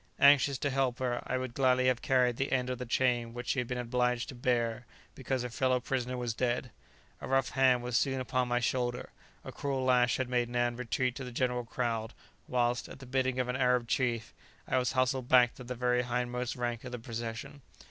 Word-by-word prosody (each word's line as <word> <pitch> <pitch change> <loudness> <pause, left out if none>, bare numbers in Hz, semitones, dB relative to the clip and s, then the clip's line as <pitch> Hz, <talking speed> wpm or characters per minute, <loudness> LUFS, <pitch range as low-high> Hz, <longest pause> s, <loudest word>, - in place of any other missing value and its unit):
Anxious 140 -1 +5
to 140 +1 -1
help 130 -2 0
her, 125 -2 -1
I 130 - 0
would 130 -2 -4
gladly 130 -1 +3
have 130 -2 +2
carried 125 -2 +2
the 135 - -1
end 130 -1 +1
of 125 - -4
the 125 - -5
chain 120 -2 +1
which 120 - -5
she 135 - +1
had 125 - -2
been 125 - -3
obliged 125 0 0
to - - -6
bear 120 -1 -1 0.3
because 130 -1 -2
her 125 - -3
fellow 130 +1 +1
prisoner 125 0 -2
was 120 -2 -2
dead. 125 +1 -1 0.5
A - - -5
rough 135 -1 +2
hand 130 -2 +3
was 125 -1 -3
soon 135 -2 0
upon 130 0 0
my 120 0 +1
shoulder; 120 0 -1 0.3
a - - -7
cruel 135 -2 -2
lash 125 -1 +3
had 130 - -1
made 120 -1 0
Nan 120 0 0
retreat 125 +1 -1
to 135 - -5
the 125 - -7
general 125 0 -1
crowd, 115 -1 -2 0.3
whilst, 120 -1 0
at - - -9
the 135 - -11
bidding 130 0 0
of 125 - 0
an 125 - -2
Arab 125 -2 +2
chief, 120 -3 -1 0.3
I - - +2
was 125 0 -1
hustled 130 -1 0
back 125 -1 +6
to 130 - -11
the 125 +1 -5
very 125 0 +1
hindmost 125 0 -2
rank 120 -2 -3
of 125 - -7
the 125 - -4
procession. 115 +3 -6
125 Hz, 220 wpm, -31 LUFS, 120-130 Hz, 0.5 s, back